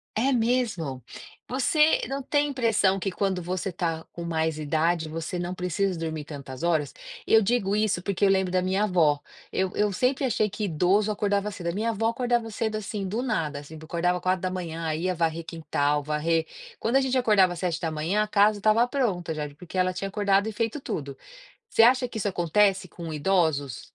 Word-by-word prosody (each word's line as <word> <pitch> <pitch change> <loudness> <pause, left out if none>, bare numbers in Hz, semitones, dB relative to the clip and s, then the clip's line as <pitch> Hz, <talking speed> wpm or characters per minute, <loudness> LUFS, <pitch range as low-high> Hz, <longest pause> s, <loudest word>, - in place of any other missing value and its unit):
É 260 +5 +2
mesmo? 225 - 0 0.5
Você 300 +5 +3
não 275 +1 -3
tem 290 +2 +1
impressão 225 -7 +2
que 195 +1 -2
quando 190 -1 -1
você 185 +2 -3
tá 165 -2 -3
com 170 - -6
mais 160 -2 -1
idade 160 +2 0
você 165 +2 -4
não 175 +1 -3
precisa 180 +1 -1
dormir 160 -2 -3
tantas 140 -3 -8
horas? 160 -5 +1 0.3
Eu 225 - +5
digo 205 -2 +1
isso 210 -3 +1
porque 200 +1 -2
eu 200 - +6
lembro 190 -2 +2
da 185 - +2
minha 190 +3 +1
vó. 165 -7 +3 0.3
Eu 190 -1 0
eu 210 0 +2
sempre 255 +8 0
achei 215 -4 +1
que 210 -1 -3
idoso 190 +5 +2
acordava 205 0 0
cedo, 180 -4 -7
a - - 0
minha 220 +4 -1
avó 225 0 0
acordava 240 -1 0
cedo, 220 0 -2
assim, 210 -2 -4
do 225 +7 -2
nada, 160 - -1
assim, 145 +2 -11
acordava 175 +2 -1
4h, 180 -3 -2
ia 180 +3 -1
varrer 165 0 -1
quintal, 150 -3 -1
varrer 160 +2 0 0.3
quando 235 +4 0
a 270 - +4
gente 265 0 +1
acordava 205 -7 +4
às 170 - -8
7h 165 +2 -1
a - - -4
casa 210 0 +3
estava 220 +3 +4
pronta 200 - -1
já, 150 -1 -4
porque 180 +4 -9
ela 185 0 +2
tinha 195 +2 -4
acordado 200 0 +2
e 220 - -2
feito 230 +5 -2
tudo. 140 - -5 0.5
Você 225 - +4
acha 250 +2 +5
que 240 - -10
isso 205 - 0
acontece 190 +1 +2
com 165 -1 -7
idosos? 150 - 0
185 Hz, 190 wpm, -26 LUFS, 165-215 Hz, 0.5 s, eu